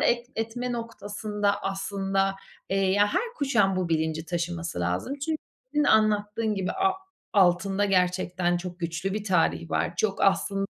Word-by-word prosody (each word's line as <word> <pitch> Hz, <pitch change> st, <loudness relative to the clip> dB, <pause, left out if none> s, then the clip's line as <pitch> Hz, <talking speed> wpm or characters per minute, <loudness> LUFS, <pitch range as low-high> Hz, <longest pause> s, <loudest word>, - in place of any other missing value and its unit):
et 240 Hz, 0 st, +2 dB
etme 245 Hz, +3 st, -2 dB
noktasında 210 Hz, -3 st, -2 dB
aslında, 195 Hz, 0 st, 0 dB, 0.4 s
eee, 195 Hz, -, +1 dB
ya 195 Hz, +2 st, +4 dB
her 370 Hz, -, +2 dB
kuşağın 210 Hz, -9 st, +2 dB
bu 185 Hz, -2 st, 0 dB
bilinci 160 Hz, 0 st, 0 dB
taşıması 170 Hz, -, -3 dB
lazım 90 Hz, -, -2 dB
çünkü 310 Hz, +2 st, -2 dB, 0.4 s
senin 295 Hz, -, +3 dB
anlattığın 215 Hz, -1 st, +2 dB
gibi, 190 Hz, -2 st, -2 dB
a-altında 205 Hz, -, +1 dB
gerçekten 180 Hz, -2 st, +1 dB
çok 175 Hz, 0 st, -6 dB
güçlü 170 Hz, +3 st, -2 dB
bir 210 Hz, 0 st, -3 dB
tarih 170 Hz, -3 st, +1 dB
var. -, -, 0 dB
Çok 195 Hz, +1 st, 0 dB
aslın 195 Hz, 0 st, +2 dB
195 Hz, 140 wpm, -27 LUFS, 180-220 Hz, 0.4 s, ya